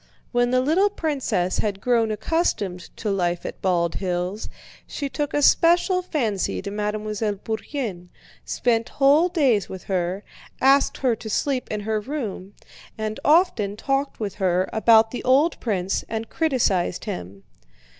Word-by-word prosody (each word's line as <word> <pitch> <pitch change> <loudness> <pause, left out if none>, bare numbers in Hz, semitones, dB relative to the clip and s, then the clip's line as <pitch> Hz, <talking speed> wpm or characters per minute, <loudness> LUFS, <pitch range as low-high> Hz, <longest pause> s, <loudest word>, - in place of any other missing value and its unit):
When 245 0 +2
the 255 0 +3
little 340 +10 +3
princess 265 - -1
had 205 -2 -1
grown 230 0 +2
accustomed 210 - -1
to 215 - -2
life 175 -3 -1
at - - -7
Bald 170 -3 +1
Hills, 180 +2 -3 0.4
she 285 -2 -4
took 290 +1 -3
a 290 - 0
special 350 +5 +4
fancy 235 - -1
to 200 - -5
Mademoiselle 210 0 -2
Bourienne, 215 -3 -5 0.3
spent 230 -2 0
whole 290 +5 +5
days 270 - +2
with 190 - -8
her, 185 +1 -2 0.4
asked 275 +1 +4
her 250 -4 +1
to 220 - -8
sleep 260 +4 -1
in 210 -1 -3
her 215 +1 -1
room, 210 -6 -5 0.4
and 215 0 -3
often 295 - +3
talked 275 +3 -1
with 205 -3 -3
her 185 -1 +1
about 220 0 +5
the 245 - -5
old 275 +6 +3
prince 195 -4 -1
and 225 0 -4
criticized 235 - 0
him. 100 - -6
220 Hz, 145 wpm, -23 LUFS, 195-275 Hz, 0.4 s, whole